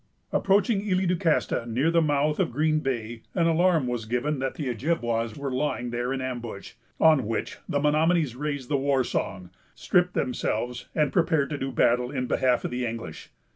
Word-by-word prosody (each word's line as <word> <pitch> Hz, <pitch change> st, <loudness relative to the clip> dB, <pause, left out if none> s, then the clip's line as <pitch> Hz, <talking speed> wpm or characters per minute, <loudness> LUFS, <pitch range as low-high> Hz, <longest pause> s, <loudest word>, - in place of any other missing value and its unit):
Approaching 200 Hz, +1 st, +2 dB
Isle 185 Hz, 0 st, +2 dB
du 180 Hz, 0 st, +2 dB
Castor, 160 Hz, -8 st, 0 dB
near 130 Hz, +8 st, +1 dB
the 170 Hz, 0 st, +4 dB
mouth 150 Hz, 0 st, +1 dB
of 185 Hz, -, +1 dB
Green 155 Hz, +4 st, +1 dB
Bay, 120 Hz, -5 st, -3 dB
an 170 Hz, -3 st, +2 dB
alarm 165 Hz, -2 st, +3 dB
was 120 Hz, -3 st, -3 dB
given 125 Hz, +6 st, -1 dB
that 135 Hz, 0 st, -2 dB
the 150 Hz, -, -4 dB
Ojibwas 120 Hz, -3 st, -1 dB
were 140 Hz, -1 st, -3 dB
lying 125 Hz, -2 st, -1 dB
there 120 Hz, +1 st, -2 dB
in 135 Hz, -1 st, -2 dB
ambush; 120 Hz, -6 st, -5 dB, 0.3 s
on 155 Hz, -8 st, +5 dB
which 115 Hz, -, -3 dB
the 145 Hz, -, +1 dB
Menomonies 155 Hz, -1 st, +2 dB
raised 145 Hz, -1 st, -3 dB
the 145 Hz, -, +1 dB
war 135 Hz, -1 st, +2 dB
song, 95 Hz, -6 st, -3 dB, 0.2 s
stripped 180 Hz, 0 st, +1 dB
themselves, 125 Hz, -1 st, -2 dB
and 150 Hz, -3 st, +1 dB
prepared 160 Hz, -5 st, +2 dB
to 145 Hz, -, -2 dB
do 135 Hz, 0 st, -3 dB
battle 125 Hz, 0 st, +2 dB
in 130 Hz, -2 st, -2 dB
behalf 125 Hz, 0 st, +1 dB
of -, -, -3 dB
the 125 Hz, +1 st, -2 dB
English. 115 Hz, -9 st, -6 dB
135 Hz, 185 wpm, -26 LUFS, 120-160 Hz, 0.3 s, on